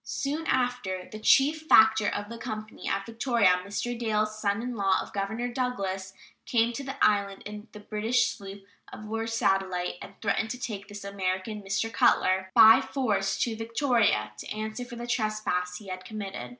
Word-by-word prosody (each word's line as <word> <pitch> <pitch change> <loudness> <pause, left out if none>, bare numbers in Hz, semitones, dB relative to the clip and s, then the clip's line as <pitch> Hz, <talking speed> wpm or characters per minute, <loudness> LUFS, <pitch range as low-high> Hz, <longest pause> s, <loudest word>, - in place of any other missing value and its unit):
Soon 300 +4 -3
after 245 -8 -1
"the 215 - -7
chief 300 +7 +3
factor 220 -3 +6
of 205 0 -2
the 230 +1 -8
company 215 -2 -6
at 195 0 -1
Victoria, 230 -6 +2
Mr. 205 +5 -3
Dalles, 215 -2 0
son 205 +1 0
in 250 0 -4
law 195 -3 +2
of - - -7
Governor 220 +5 -2
Douglas, 195 -7 -3 0.3
came 235 0 +2
to 275 - -5
the 270 0 -5
island 200 -2 +1
in 210 +1 -8
the 210 - -11
British 220 +4 +1
sloop 195 -2 -10 0.3
of 215 - -9
war 225 +1 -3
Satellite 190 -5 0
and 200 - -11
threatened 220 +1 0
to 250 0 -5
take 205 -5 -5
this 205 0 -9
American 200 +2 -3
[Mr. 200 +3 -2
Cutler] 190 0 +3
by 225 +2 +9
force 220 -9 -1
to 230 -2 -2
Victoria 225 - +1
to - - -8
answer 215 +3 -4
for 245 -1 -9
the 235 0 -6
trespass 215 -6 -1
he 200 -1 -11
had 185 0 -6
committed. 195 - -6
215 Hz, 175 wpm, -28 LUFS, 195-235 Hz, 0.3 s, by